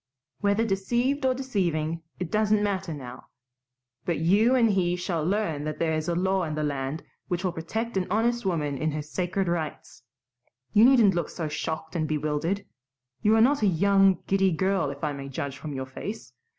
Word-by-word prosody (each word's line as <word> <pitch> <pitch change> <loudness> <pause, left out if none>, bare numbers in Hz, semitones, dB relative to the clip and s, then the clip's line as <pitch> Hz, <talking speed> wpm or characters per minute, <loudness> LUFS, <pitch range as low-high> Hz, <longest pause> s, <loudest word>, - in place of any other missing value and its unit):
Whether 205 +2 +2
deceived 240 +7 0
or 255 - +2
deceiving, 170 - -1 0.2
it 180 -3 -4
doesn't 215 -1 +2
matter 195 -3 -1
now. 125 -5 -8 0.8
But 170 - -1
you 205 - +4
and 230 -4 +4
he 180 -3 +1
shall 175 -3 -2
learn 175 -5 0
that 155 0 -3
there 165 -1 0
is 155 0 -2
a 170 - 0
law 190 +1 +1
in 155 -2 -3
the 155 - -1
land 140 +1 -2 0.2
which 175 0 -2
will 185 - +1
protect 210 +7 -3
an 185 - 0
honest 235 +2 +1
woman 150 -7 -1
in 155 -1 0
her 150 0 -3
sacred 180 +4 -2
rights. 165 -7 -4 0.7
You 215 +2 +7
needn't 240 -7 +6
look 175 - -1
so 165 -3 -4
shocked 160 +3 -4
and 155 -2 0
bewildered. 155 +6 -1 0.6
You 215 +1 +4
are 225 - +5
not 280 +5 +4
a 210 - +4
young, 195 +1 +4
giddy 195 -1 +2
girl 190 -1 +1
if 140 +2 -8
I 150 -1 0
may 140 -1 -7
judge 135 0 -4
from 150 -3 -6
your 130 0 -3
face. 120 -2 -7
175 Hz, 190 wpm, -26 LUFS, 155-205 Hz, 0.8 s, You